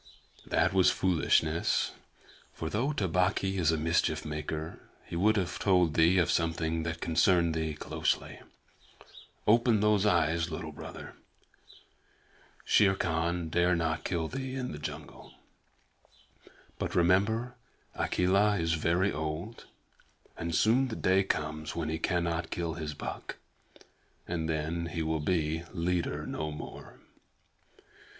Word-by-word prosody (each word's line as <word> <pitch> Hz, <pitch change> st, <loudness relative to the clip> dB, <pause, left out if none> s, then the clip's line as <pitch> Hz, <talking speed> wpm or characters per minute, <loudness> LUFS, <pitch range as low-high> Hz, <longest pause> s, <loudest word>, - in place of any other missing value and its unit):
"That -, -, +2 dB
was 95 Hz, -2 st, +5 dB
foolishness, 80 Hz, -2 st, +1 dB, 0.6 s
for 80 Hz, 0 st, -5 dB
though 125 Hz, -, 0 dB
Tabaqui 95 Hz, -, 0 dB
is 80 Hz, -2 st, +3 dB
a 80 Hz, -, 0 dB
mischief 80 Hz, 0 st, 0 dB
maker, 75 Hz, +1 st, -4 dB, 0.3 s
he -, -, -7 dB
would 105 Hz, +5 st, +3 dB
have 90 Hz, -3 st, -2 dB
told 90 Hz, -5 st, +3 dB
thee 85 Hz, +4 st, +4 dB
of 85 Hz, -2 st, +3 dB
something 80 Hz, -1 st, 0 dB
that 85 Hz, 0 st, -4 dB
concerned 85 Hz, 0 st, +3 dB
thee 80 Hz, -1 st, -2 dB
closely. -, -, -2 dB, 1.1 s
Open 115 Hz, 0 st, +4 dB
those 105 Hz, -1 st, +3 dB
eyes, 85 Hz, -5 st, +2 dB
Little 80 Hz, 0 st, -5 dB
Brother. 75 Hz, -, -9 dB, 1.5 s
Shere 95 Hz, -2 st, +4 dB
Khan 85 Hz, 0 st, -1 dB
dare 90 Hz, +2 st, +3 dB
not 80 Hz, -1 st, -1 dB
kill 85 Hz, -3 st, -1 dB
thee 130 Hz, +3 st, -5 dB
in 125 Hz, -1 st, -3 dB
the 75 Hz, -, -7 dB
jungle. 75 Hz, -, -8 dB, 1.4 s
But -, -, -3 dB
remember, 100 Hz, +8 st, +2 dB, 0.4 s
Akela 100 Hz, +3 st, +2 dB
is 80 Hz, -1 st, 0 dB
very 85 Hz, +4 st, +1 dB
old, 80 Hz, +8 st, -5 dB, 0.7 s
and 85 Hz, 0 st, -3 dB
soon 120 Hz, +7 st, +3 dB
the 110 Hz, -, -5 dB
day 95 Hz, +1 st, +3 dB
comes 75 Hz, -4 st, -3 dB
when 80 Hz, -2 st, -2 dB
he 80 Hz, 0 st, -2 dB
cannot 85 Hz, -1 st, -1 dB
kill 85 Hz, -2 st, -2 dB
his 80 Hz, -2 st, -5 dB
buck, -, -, -6 dB, 0.9 s
and 80 Hz, -2 st, -2 dB
then 80 Hz, +2 st, -2 dB
he 85 Hz, -1 st, -3 dB
will 80 Hz, 0 st, -1 dB
be 80 Hz, 0 st, 0 dB
leader 90 Hz, 0 st, -1 dB
no 75 Hz, +1 st, -3 dB
more. 75 Hz, -, -9 dB
85 Hz, 130 wpm, -30 LUFS, 80-95 Hz, 1.5 s, was